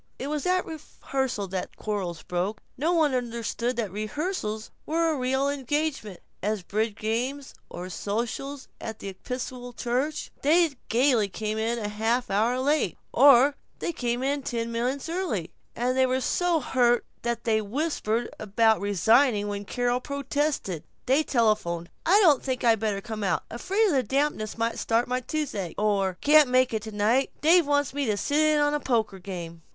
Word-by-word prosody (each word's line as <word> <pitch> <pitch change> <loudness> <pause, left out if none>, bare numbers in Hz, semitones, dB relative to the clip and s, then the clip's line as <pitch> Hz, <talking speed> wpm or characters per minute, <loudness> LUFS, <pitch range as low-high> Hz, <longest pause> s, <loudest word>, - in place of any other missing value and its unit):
It 280 +3 -4
was 300 +3 -2
at 365 0 +2
rehearsals 265 - -4
that 185 -1 -3
the - - -26
quarrrels 190 -6 -3
broke. 185 +4 -2 0.2
No 310 +6 0
one 315 -5 +3
understood 235 0 -2
that 220 -5 -2
rehearsals 215 - -3
were 330 +1 +1
as 290 - -3
real 265 +2 +1
engagements 280 - -2 0.2
as 210 -1 -1
bridge 215 +3 -1
games 250 +6 -3 0.2
or 180 +1 -6
sociables 235 - -4
at 220 -1 -5
the 200 - -6
Episcopal 245 +4 -6
Church. 260 +6 -2
They 325 +3 +4 0.2
gaily 240 -3 +3
came 215 +2 -3
in 230 +2 0
half 225 +4 -1
an - - +1
hour 235 +5 +2
late, 290 +4 +1 0.2
or 280 0 +7 0.2
they - - -2
vociferously - - -16
came 245 -2 -2
in 280 +1 0
ten 235 -3 -3
minutes 250 +5 -2
early, 325 - -2 0.2
and 250 +2 0
they 260 0 +4
were 255 +1 +1
so 345 +5 +1
hurt 245 -3 +2 0.2
that 235 -1 -2
they 220 -2 +2
whispered 235 -1 -1
about 220 +1 +2
resigning 205 +2 +3
when 205 0 -4
Carol 245 +3 0
protested. 280 - -2 0.2
They 265 +4 +4
telephoned, 215 - 0 0.2
"I 390 +5 +6
don't 305 -9 +5
think 260 -2 -3
I'd 225 -2 +4
better 210 -2 -1
come 220 -1 -5
out; 195 - 0
afraid 390 - +1
the 270 -4 +3
dampness 265 -3 -1
might 230 0 -1
start 230 +1 +1
my 250 +1 0
toothache," 250 - -3
or 195 -3 +1
"Guess 295 - +2
can't 300 -4 +8
make 255 -1 +3
it 220 - -1
tonight; 220 +5 +1
Dave 330 0 +5
wants 285 -2 +1
me 285 -2 -1
to 210 -2 +1
sit 290 +8 0
in 310 -1 +4
on 290 0 +2
a 295 - +1
poker 220 -8 0
game." 170 -3 -7
245 Hz, 175 wpm, -26 LUFS, 215-285 Hz, 0.2 s, can't